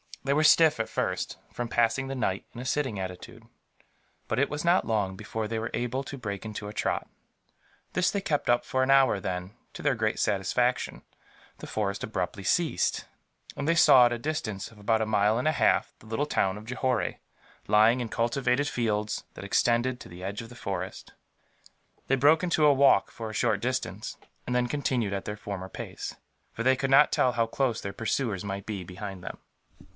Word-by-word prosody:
They 140 +1 +1
were 155 +2 +3
stiff, 155 -2 +6
at 110 - -1
first, - - -2
from 120 - -4
passing 115 +3 +1
the 135 - -4
night 100 -6 -1
in 120 - -7
a - - -7
sitting 130 -6 -1
attitude; 90 -1 -7 0.8
but 110 - -1
it 140 - +2
was 150 +2 -4
not 175 +2 +4
long 105 -4 0
before 105 +2 -4
they 115 +1 -3
were 110 +1 -3
able 125 +3 -2
to 140 - -7
break 100 -4 -5
into 105 -1 -6
a 105 - -7
trot. - - -1 0.9
This 180 0 +2
they 200 - -1
kept 145 -8 -1
up 120 0 +4
for 130 - -1
an 135 - +2
hour 135 -6 +5
then, 90 0 -4 0.2
to - - -8
their 135 - +2
great 110 -1 -1
satisfaction, 105 +5 0 0.5
the - - -9
forest 100 -2 -2
abruptly 100 -1 -3
ceased, 165 - +1 0.5
and 145 - -3
they 165 - +3
saw, 125 -6 +7
at - - -3
a 120 - -2
distance 115 -9 -3
of 110 - -17
about 110 +2 +1
a 110 - 0
mile 105 0 +3
and 130 - 0
a - - +5
half, - - +2
the 110 - -17
little 125 +7 -1
town 95 -8 +1
of 105 - -10
Johore, 125 0 -1 0.5
lying 110 +4 +5
in 120 -2 -3
cultivated 125 +4 +1
fields 110 -5 -1
that - - -8
extended 120 +4 +2
to - - -11
the 90 +1 -10
edge 100 +3 -4
of 115 - -10
the 120 - -12
forest. 95 -5 -5 0.9
They 135 - +3
broke 145 +6 +4
into 165 -4 +2
a 145 - +7
walk, 135 -7 +4
for 115 -1 -6
a - - -7
short 110 -2 +1
distance; 110 -4 -3 0.3
and 125 - -1
then 125 0 +2
continued 125 -6 -1
at 100 - -3
their 105 0 -4
former 95 -3 -6
pace, - - -7 0.4
for - - -5
they 130 +1 +4
could 135 +1 -2
not 140 +2 +7
tell 125 - +2
how 115 0 +2
close 120 -1 -1
their 100 - -5
pursuers 110 -3 -1
might 100 0 -5
be 100 -4 -4
behind 95 +1 -8
them. - - -6
115 Hz, 205 wpm, -28 LUFS, 105-130 Hz, 0.9 s, saw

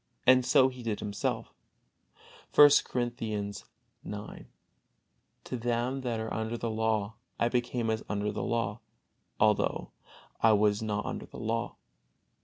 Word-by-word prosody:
And 130 0 +6
so 130 +1 +5
he 125 -1 -10
did 110 -3 -2
himself, 100 -1 -3 1.0
I. 145 0 +11
Corinthians 110 -4 -3 0.4
ix: 105 0 -8 1.0
"To - - -5
them 120 +3 -1
that 120 -3 -2
are 110 0 -4
under 110 +1 -2
the 115 -1 -3
law, 110 -1 -1 0.2
I 115 - +2
became 120 -2 0
as 110 0 -2
under 105 0 -1
the 105 - -4
law, 115 -2 -1 0.6
although 105 -1 +2 0.5
I 110 -1 +6
was 105 0 +3
not 105 -1 -2
under - - -5
the - - -11
law." 115 +1 -2
110 Hz, 135 wpm, -30 LUFS, 105-120 Hz, 1.0 s, I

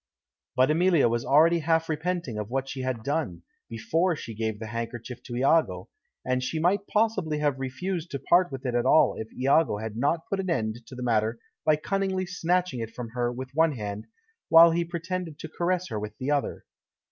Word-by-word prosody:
But 130 +3 +4
Emilia 170 -3 +4
was 120 0 0
already 165 +5 +5
half 165 +1 +1
repenting 160 -7 -2
of 105 0 -5
what 135 +2 -2
she 135 -1 -5
had 130 -3 -3
done, 135 - -2 0.3
before 160 +11 0
she 115 -6 -7
gave 110 0 -2
the 110 - -7
handkerchief 115 +2 -6
to 120 -1 -7
Iago, 125 - +2 0.4
and 130 0 0
she 130 +5 -2
might 185 +5 +1
possibly 210 -8 +1
have 145 -3 0
refused 170 +6 -3
to 140 - -3
part 175 +5 +3
with 135 0 -7
it 125 - -1
at 120 0 +1
all 160 - +5
if 110 - -7
Iago 135 -2 +2
had 110 0 -5
not 145 +7 0
put 195 - -2
an 190 -1 -2
end 115 -6 -2
to 130 - -10
the 125 - -6
matter 115 -1 +1 0.3
by 155 - +5
cunningly 190 +3 -1
snatching 180 -4 0
it 115 -1 -4
from 120 -2 -6
her 120 +1 -1
with 130 +1 -7
one 160 +1 +3
hand, 105 -3 -5 0.4
while 165 +1 +9
he 170 +1 +1
pretended 170 -1 -4
to - - -7
caress 175 +3 -1
her 110 - -3
with 105 0 -7
the 130 +3 -2
other. 145 -1 -1
140 Hz, 205 wpm, -27 LUFS, 120-170 Hz, 0.4 s, while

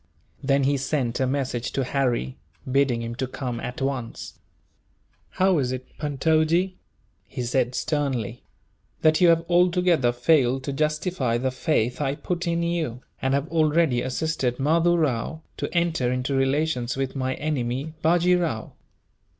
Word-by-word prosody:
Then 140 0 +2
he 140 +1 +2
sent 135 -3 -1
a 130 - +2
message 130 -3 -2
to 135 - 0
Harry, 125 - -1 0.4
bidding 130 -3 +2
him 115 0 -4
to 130 -2 -2
come, 125 -2 -4
at 125 +2 -5
once. 130 -4 -4 0.9
"How 185 -3 +2
is 125 -2 0
it, 130 0 -7
Puntojee," 160 +5 +1 0.5
he - - -5
said 125 +1 0
sternly, 130 -7 -2 0.6
"that 155 +2 +4
you 180 - +7
have 165 0 +3
altogether 175 -6 +3
failed 130 0 +2
to 140 - -3
justify 150 -4 0
the 130 +2 -1
faith 130 -2 0
I 140 -1 0
put 175 +3 -3
in 170 0 0
you, 160 -8 -2 0.2
and 130 +1 +1
have 140 +2 -1
already 155 -5 +2
assisted 130 -1 -1
Mahdoo 165 +5 +3
Rao 155 +1 -1
to - - -3
enter 170 -8 +1
into 125 +2 -1
relations 135 -2 0
with 135 0 -2
my 130 -1 -1
enemy, 140 0 -2
Bajee 175 +2 +3
Rao?" 145 -10 -3
140 Hz, 150 wpm, -25 LUFS, 125-160 Hz, 0.9 s, you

